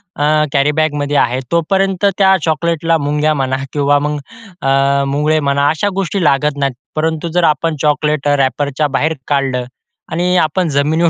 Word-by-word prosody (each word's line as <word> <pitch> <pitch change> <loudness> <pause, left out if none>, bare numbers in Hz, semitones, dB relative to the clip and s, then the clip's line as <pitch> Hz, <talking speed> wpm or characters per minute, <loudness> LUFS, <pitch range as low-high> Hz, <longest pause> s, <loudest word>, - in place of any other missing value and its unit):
अ, 145 - -2 0.3
कॅरीबॅगमध्ये 145 0 +1
आहे 125 +2 +1
तोपर्यंत 190 +3 +1
त्या 190 -1 +5
चॉकलेटला 165 +1 0
मुंग्या 150 +1 0
म्हणा 130 -2 -1 0.2
किंवा 145 0 +2
मग 150 +1 -2 0.4
अ, 135 +1 +2
मुंगळे 150 +3 +1
म्हणा 140 0 +1
अशा 160 +6 0
गोष्टीला 180 -2 +1
लागत 145 +1 0
नाहीत. 140 -2 0 0.2
परंतु 160 +1 -1
जर 175 -1 +2
आपण 165 +3 -3
चॉकलेट 150 -1 0
रॅपरच्या 145 +1 0
बाहेर 160 +2 0
काढलं 135 -3 0 0.5
आणि 180 +2 0
आपण 165 +2 0
जमिनीवर 160 +4 +2
150 Hz, 145 wpm, -15 LUFS, 140-165 Hz, 0.5 s, त्या